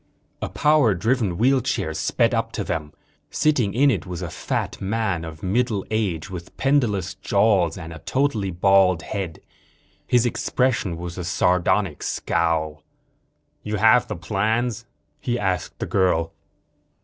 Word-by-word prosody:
A - - -3
power 150 -8 +3
driven 110 -2 0
wheelchair 125 -7 +1
sped 115 +10 +1
up 115 0 -1
to 105 - -2
them. 80 -5 -3 0.4
Sitting 130 -10 +1
in 140 +3 +5
it 95 -9 -3
was 90 -2 -5
a - - -5
fat - - -3
man 95 -4 -1
of 80 -1 -9
middle 105 +1 0
age, 105 -6 -1
with 90 -3 -9
pendulous 120 -10 +1
jowls 95 -7 +2
and 80 -2 -8
a 80 - -9
totally 130 - 0
bald 95 -1 +3
head. 95 -4 -5 0.7
His 125 -1 +3
expression 120 -6 0
was 85 +1 -6
a - - -3
sardonic 90 0 +1
scowl. 80 -2 -1 0.8
"You 105 0 -3
have 110 +4 +4
the 105 - -4
plans?" 110 +7 -1 0.3
he 120 0 -1
asked 95 -4 -2
the - - -3
girl. 90 -4 +1
100 Hz, 140 wpm, -23 LUFS, 85-115 Hz, 0.8 s, in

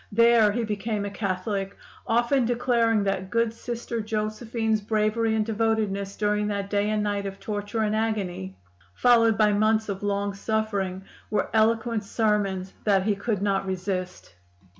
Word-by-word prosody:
There 230 -1 +5
he 235 +3 -1
became 210 -1 -2
a 200 - -4
Catholic, 195 0 -3 0.3
often 240 +3 +2
declaring 235 -2 +2
that 190 -1 -2
good 230 +1 +1
Sister 235 0 -4
Josephine's 220 +1 -1
bravery 215 +1 +1
and 215 -1 +1
devotedness 215 -3 -1
during 210 0 0
that 200 -1 -3
day 205 0 +1
and 215 -1 0
night 200 -1 -1
of 195 0 -7
torture 205 +1 -3
and 215 0 +1
agony, 190 - -2 0.4
followed 230 -3 +4
by 210 0 +4
months 215 +1 +2
of 195 -1 -3
long 200 0 -1
suffering, 200 -3 -2 0.3
were 210 - -1
eloquent 225 0 +2
sermons 200 -3 0
that 195 -3 +3
he 210 +1 +2
could 200 -1 -2
not 195 -1 0
resist. 185 - -4
210 Hz, 150 wpm, -26 LUFS, 200-225 Hz, 0.4 s, There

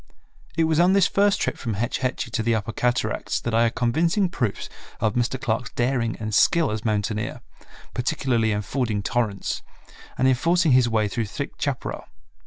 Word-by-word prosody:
It 165 - +4
was 160 0 +2
on 180 +2 +5
this 195 -2 +5
first 200 0 +2
trip - - -1
from 115 -5 -3
Hetch 115 +4 -1
Hetchy 130 -2 -2
to 115 - 0
the 115 +1 +1
upper 110 +1 -3
cataracts 125 +2 0
that 120 - -4
I 115 +1 +4
had 115 - -1
convincing 165 - +1
proofs 120 - -2 0.3
of 110 -2 +1
Mr. 120 +2 0
Clark's 120 0 -1
daring 120 -2 0
and 110 -1 -4
skill 165 - +4
as 110 0 -3
mountaineer, 105 -1 -1 0.5
particularly 125 -3 0
in 105 0 -1
fording 110 -2 -1
torrents, 105 -3 -1 0.6
and 130 - +3
in 130 - +5
forcing 170 +4 +2
his 125 -2 +5
way 110 -2 +1
through 115 +2 -2
thick 105 - -5
chaparral. - - -3
120 Hz, 185 wpm, -24 LUFS, 110-135 Hz, 0.6 s, on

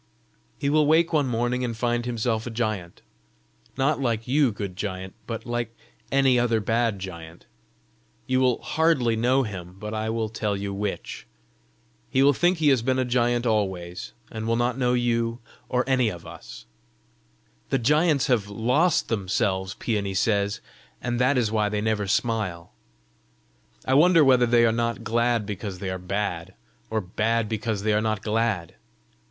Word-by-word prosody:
"He 140 - -2
will 150 +1 +3
wake 165 +2 +3
one 145 -3 +2
morning 120 +1 -1
and 115 -2 -3
find 120 +1 0
himself 115 -1 -1
a - - -3
giant 110 -7 -3 0.7
not 140 +2 +1
like 115 -3 -1
you, 135 -1 +3
good 100 -3 -5
giant, 95 -2 -5
but 115 -2 -5
like 120 -1 -3 0.4
any 135 -2 +4
other 115 -2 +2
bad 115 0 0
giant. 85 -3 -9 0.8
You 130 0 +1
will 125 -3 +2
hardly 130 -3 +2
know 125 +4 +2
him, 90 -5 -7
but 105 +2 -6
I 110 0 -2
will 110 0 -1
tell 105 -2 -2
you 100 0 -4
which. 100 0 -5 0.8
He 135 - +3
will 145 +1 +6
think 175 +6 +2
he 155 -2 +3
has 130 -4 +3
been 130 +2 0
a 130 - +1
giant 120 0 +1
always, 95 -2 -2 0.2
and 110 0 -5
will 115 - +2
not 120 +1 +1
know 125 -2 +1
you, 115 -1 0 0.3
or 125 0 +1
any 130 -4 +3
of 85 -4 -8
us. - - -11 1.0
The 135 - +2
giants 150 +3 +3
have 110 -6 +1
lost 125 - +2
themselves, 95 -2 -1
Peony 100 -4 -2
says, 100 0 +1 0.4
and 120 -1 -2
that 130 +2 +3
is 115 -4 +1
why 105 -2 +1
they 105 0 -1
never 105 -1 0
smile. 105 -6 -1 1.1
I 130 - +1
wonder 165 +3 +6
whether 125 -3 +5
they 120 0 +5
are 115 - +3
not 115 +1 -1
glad 115 -1 +1
because 100 -1 -5
they 95 0 -4
are 95 - -4
bad, 90 -1 -3 0.3
or 110 0 -1
bad 110 +4 0
because 110 -1 -2
they 110 0 +2
are 105 - +2
not 110 -2 -1
glad. 110 -6 -1
115 Hz, 170 wpm, -25 LUFS, 105-125 Hz, 1.1 s, will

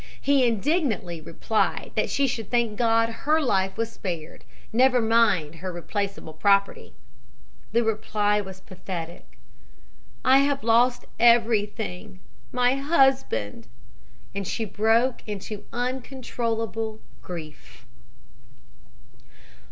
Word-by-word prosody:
He 275 -3 +3
indignantly 225 - 0
replied 210 +7 -1
that - - 0
she 280 - +1
should 230 -5 -3
thank 235 -3 +1
God 230 0 +3
her 290 +7 0
life 195 -9 0
was 230 0 -2
spared, 170 -5 -6 0.3
never 255 +2 +4
mind 220 -9 +2
her 185 +2 -5
replaceable 195 -1 -4
property. 200 +5 +1 0.8
The 235 +1 +2
reply 210 -1 0
was 190 -1 -10
pathetic: 170 - -8 0.9
"'I 265 +1 +6
have 280 0 +1
lost 240 +2 +3
everything 220 -5 +2 0.3
my 250 +1 +2
husband,' 265 - +1 0.7
and 200 -1 -4
she 225 +2 -2
broke 225 +5 +2
into 205 0 -6
uncontrollable 230 -3 -3 0.2
grief. 155 -7 -10
225 Hz, 100 wpm, -25 LUFS, 190-245 Hz, 0.9 s, I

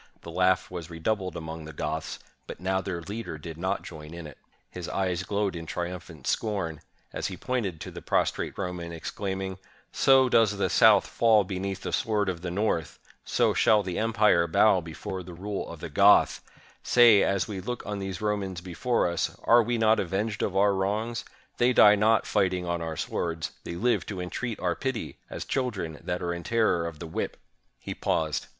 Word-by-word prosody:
The 85 - -8
laugh 90 +2 +2
was 85 -2 -6
redoubled 95 +3 -2
among 80 -1 -7
the 80 - -9
Goths; 80 +1 -3 0.3
but - - -8
now 95 +1 0
their 90 -3 -4
leader 105 -3 -5
did 80 +1 -8
not 95 +4 -2
join 80 0 -9
in 85 -1 -8
it. 75 -4 -11 0.3
His 90 -2 -6
eyes 90 -2 -1
glowed 100 -1 -1
in 80 -1 -6
triumphant 85 -5 -6
scorn, 95 -8 -1 0.3
as - - -2
he 95 - -6
pointed 110 -10 -2
to - - -6
the - - -9
prostrate - - 0
Roman, 90 -3 -4
exclaiming, 95 +3 -4 0.3
"So 135 -1 +5
does 110 -4 +3
the 100 - 0
South - - +6
fall 110 -3 +4
beneath 95 0 -4
the - - -4
sword 105 -3 +1
of 85 -3 -4
the 90 - -4
North! 85 -5 -1 0.3
So - - +2
shall 105 -1 +4
the 90 -2 -3
em 115 +1 0
pire 105 -6 +4
bow 95 +3 +4
before 85 +3 -6
the 90 -1 -10
rule 100 +3 -4
of - - -9
the - - -4
Goth! - - +5 0.4
Say, 120 -5 +6
as 100 -1 +1
we 100 -3 -5
look 120 +5 -5
on 105 -1 -4
these 95 -1 -5
Romans 100 -4 -2
before 95 +7 0
us, 85 -1 -2
are 120 +1 +6
we 120 +1 -1
not 110 0 +4
avenged 100 +4 -2
of 95 - -1
our 100 +1 +4
wrongs? 110 +5 -1 0.4
They 125 +1 +4
die 105 -3 +8
not 110 +1 +3
fighting 90 -2 +1
on 85 -1 -2
our 80 -2 -4
swords; 80 -2 -3
they 85 - -5
live 120 +7 +1
to 100 -3 -5
entreat 110 +6 -4
our 90 -1 0
pity, 130 -4 -4
as - - -6
children 105 - -2
that 90 0 -3
are 85 0 -1
in 85 - -5
terror 105 -6 +1
of 85 -2 -7
the 85 - -7
whip!" 80 - -4 0.4
He - - -5
paused. 80 -2 -1
95 Hz, 195 wpm, -27 LUFS, 85-105 Hz, 0.4 s, die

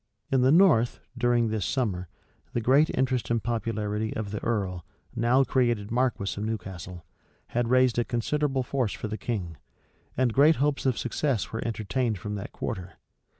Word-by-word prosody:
In 135 -1 +3
the 130 +2 +5
north, 155 -9 +5 0.2
during 120 -2 +2
this 110 -2 -1
summer, 100 -9 -1 0.5
the - - +1
great 135 +7 +4
interest 130 -2 0
and 115 -3 0
popularity 110 -1 -2
of 105 -2 -4
the 105 - -5
earl, 95 -6 -1 0.3
now 120 +4 +3
created 120 -6 0
marquis 120 -5 0
of - - -3
Newcastle, 95 -5 -5 0.4
had 120 -1 0
raised 130 -2 +4
a - - +3
considerable 135 +4 0
force 125 -4 -1
for - - -5
the 110 - -4
king; 100 - -3 0.6
and 125 -2 +2
great 150 +5 +6
hopes 145 0 0
of 130 - +1
success 125 -2 -1
were 115 - -3
entertained 115 +1 -1
from 105 +3 -5
that 100 -1 -5
quarter. 90 -1 -5
115 Hz, 165 wpm, -27 LUFS, 105-130 Hz, 0.6 s, great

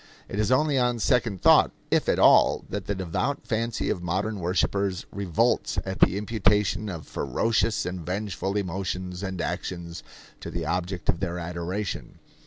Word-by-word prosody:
It 100 - -4
is 110 +3 +1
only 140 +1 +3
on 125 -1 +2
second 115 -5 +1
thought, - - +7 0.2
if - - +2
at - - +3
all, - - +5
that 100 -1 -4
the 100 - -1
devout 95 +10 -2
fancy 115 0 -1
of 90 - -2
modern 95 +5 -2
worshippers 95 +1 0
revolts 95 -5 0
at 95 0 -4
the 95 - +4
imputation 105 -1 +1
of 85 -5 -6
ferocious 115 -2 0
and 90 -1 -4
vengeful 95 +2 -2
emotions 90 -1 -3
and 95 -2 -4
actions 85 -1 -4 0.4
to - - -7
the 85 -2 -4
object 90 +2 -2
of 85 - +2
their 90 -2 -2
adoration. 90 +4 -4
95 Hz, 160 wpm, -26 LUFS, 90-105 Hz, 0.4 s, thought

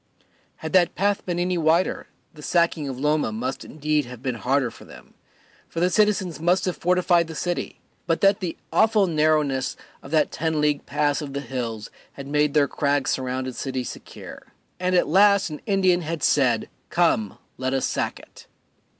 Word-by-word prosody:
Had 160 - -7
that 180 -2 +4
path 200 +1 0
been 175 -1 -1
any 180 0 0
wider 165 +3 +1 0.3
the 150 - -13
sacking 160 -1 +1
of 130 -1 -6
Loma 150 -4 +1
must 125 +5 -4
indeed 150 -1 -1
have 125 0 -11
been 130 -2 -1
harder 125 +1 0
for - - -14
them, - - -15 0.6
for 165 - -4
the 180 +2 +2
citizens 195 -5 +1
must 175 +3 +2
have 180 - -1
fortified 175 -1 +2
the 160 - -8
city 175 +2 -3 0.3
but 165 -1 +1
that 195 +1 +4
the 180 -4 -4 0.2
awful 220 -2 +4
narrowness 150 -5 +1 0.2
of - - -11
that 155 -1 +2
ten 160 -1 -1
league 150 -1 0
pass 145 0 0
of 140 -2 -6
the 140 - -3
hills 115 -4 -5 0.2
had 140 - -9
made 150 +1 +1
their 145 -2 +4
crag 145 -1 0
surrounded 130 -1 -2
city 130 -2 -3
secure. - - -10 0.3
And 185 0 0
at 175 - +3
last 200 -3 +4
an 150 - -7
Indian 185 -3 +3
had 165 0 -4
said, 125 -6 +2 0.2
"Come, 165 - +1 0.2
let 130 +1 -1
us 135 - 0
sack - - -2
it." - - -16
155 Hz, 180 wpm, -24 LUFS, 135-175 Hz, 0.6 s, that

